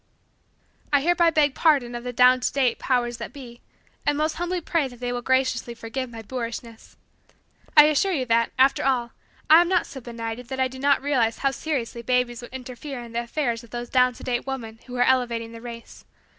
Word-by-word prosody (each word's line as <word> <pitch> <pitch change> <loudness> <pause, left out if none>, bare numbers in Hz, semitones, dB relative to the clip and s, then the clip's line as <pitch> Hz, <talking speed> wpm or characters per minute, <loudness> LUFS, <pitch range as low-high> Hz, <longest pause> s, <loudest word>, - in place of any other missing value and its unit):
I 285 -1 +4
hereby 345 +2 +3
beg 300 -4 +2
pardon 275 -7 +2
of 240 0 -5
the 250 - -4
down 250 +1 +5
to 250 - -1
date 260 -4 +1
powers 240 -2 0
that 235 - -7
be, 245 -4 -11 0.4
and 290 - +1
most 310 +1 -1
humbly 350 +1 -1
pray 330 -3 0
that 245 -2 -13
they 245 0 -3
will 245 0 -3
graciously 255 -2 0
forgive 235 +3 -5
my 225 -1 -9
boorishness. 230 -1 -7 0.8
I 300 - +12
assure 305 +6 +2
you 275 -8 -1
that, 230 -1 +2
after 265 +1 +4
all, 250 -3 +1 0.4
I 320 +2 +8
am 350 - 0
not 365 -2 +2
so 265 - -9
benighted 230 0 -6
that 265 +1 -5
I 260 - +3
do 260 0 -10
not 280 0 +2
realize 245 -6 +1
how 275 - +1
seriously 265 -6 -3
babies 250 0 0
would 240 - -11
interfere 260 +1 -7
in 235 - -11
the 235 +1 -1
affairs 240 -1 -2
of 235 - -15
those 240 +1 -6
down 250 -1 +3
to - - -13
date 245 +1 -2
women 230 -5 -5
who 250 - -7
are 245 - +3
elevating 240 -3 +1
the 230 0 -10
race. 235 -1 -10
250 Hz, 210 wpm, -24 LUFS, 235-275 Hz, 0.8 s, I